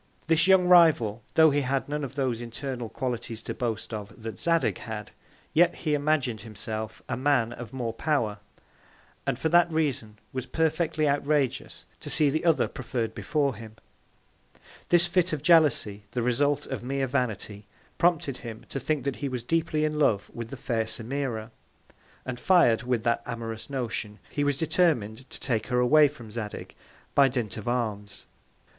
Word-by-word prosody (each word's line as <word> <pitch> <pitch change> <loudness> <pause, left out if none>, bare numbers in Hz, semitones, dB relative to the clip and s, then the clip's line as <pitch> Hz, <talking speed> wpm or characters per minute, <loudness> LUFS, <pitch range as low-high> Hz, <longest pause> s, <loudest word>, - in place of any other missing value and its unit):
This 165 +2 +3
young 190 -1 +6
Rival, 155 - +5
tho' 160 -1 +7
he 145 +1 +2
had 135 0 -1
none 150 +1 -3
of 135 0 -6
those 130 -4 -1
internal 120 0 -5
Qualities 120 -3 -4
to - - -4
boast 115 -2 -3
of 105 +1 -7
that 110 -1 -6
Zadig 165 -1 +1
had, 105 -2 -6 0.4
yet 175 +2 +4
he 155 -3 -2
imagin'd 145 -6 0
himself 110 -2 -6
a - - -2
Man 125 -3 +1
of 120 -3 -8
more 120 -4 -3
Power; 115 -6 0 0.9
and 135 -3 0
for 145 - 0
that 175 0 +5
Reason, 135 -9 -1 0.2
was 130 -1 -4
perfectly 160 -1 +1
outrageous 145 -1 0
to - - -8
see 150 -2 +3
the 155 +4 -1
other 165 -2 +3
preferr'd 120 -3 -3
before 145 0 0
him. 110 0 -11 1.1
This 175 -1 +5
Fit 180 -1 +1
of 150 -2 -3
Jealousy, 145 - +3
the 120 - -1
Result 145 +4 +1
of 130 - -5
mere 135 +2 -1
Vanity, 110 -6 -3 0.3
prompted 165 -6 +2
him 115 -2 -9
to 135 - -3
think 150 +2 -1
that 140 -2 -2
he 140 - -3
was 125 -2 -4
deeply 155 +2 0
in 150 0 -1
Love 105 -9 +2
with 115 -1 -6
the 140 - -7
fair 115 -3 -1
Semira; 115 0 -3 0.7
and 130 -1 -5
fir'd 145 -12 +4
with 120 -2 -1
that 115 0 +1
amorous 115 -1 -5
Notion, 120 -5 -3
he 145 - -1
was 145 -1 +1
determin'd 140 - 0
to - - -8
take 115 -5 -1
her 125 -1 +1
away 150 +5 +6
from 120 -7 -11
Zadig, 105 -2 -6 0.4
by 140 -1 +6
Dint 120 -6 -2
of 110 - -7
Arms. 110 -5 -3
130 Hz, 170 wpm, -27 LUFS, 115-150 Hz, 1.1 s, tho